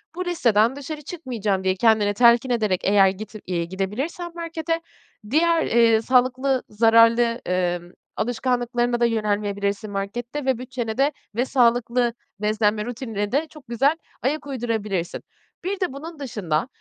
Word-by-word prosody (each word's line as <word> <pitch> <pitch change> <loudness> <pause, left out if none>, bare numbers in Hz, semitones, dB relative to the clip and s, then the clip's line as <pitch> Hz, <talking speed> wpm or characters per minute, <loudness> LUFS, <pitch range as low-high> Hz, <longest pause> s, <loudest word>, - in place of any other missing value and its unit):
"Bu 365 0 -3
listeden 235 -8 +2
dışarı 300 +2 -6
çıkmayacağım." 235 - -3
diye 190 0 +1
kendini 215 -1 +3
telkin 235 +3 +5
ederek, 215 -6 +1
eğer 195 -1 +5
git 210 +3 -7
iii, 170 -2 -1
gidebilirsen 260 - -3
markete, 330 -1 -3 0.5
diğer, 330 +3 +3
eee, 230 -1 +4
sağlıklı, 255 +2 +2
zararlı, 230 +2 +4
ımm, 175 -1 -1 0.2
alışkanlıklarına 245 +1 0
da 235 - +4
yönelmeyebilirsin 205 -1 -1
markette 240 +8 -4
ve 260 -3 +2
bütçene 245 -3 -5
de, 280 +2 +3 0.2
ve 245 +2 +1
sağlıklı 240 -1 +2 0.3
beslenme 210 0 +1
rutinine 225 -4 -4
de 300 +4 +1
çok 305 -6 -15
güzel 270 +6 +2 0.3
ayak 290 +3 -1
uydurabilirsin. 220 -9 -2 0.4
Bir 385 +1 -2
de 360 -8 -1
bunun 315 +2 -8
dışında, 205 - -2
235 Hz, 135 wpm, -23 LUFS, 210-265 Hz, 0.5 s, telkin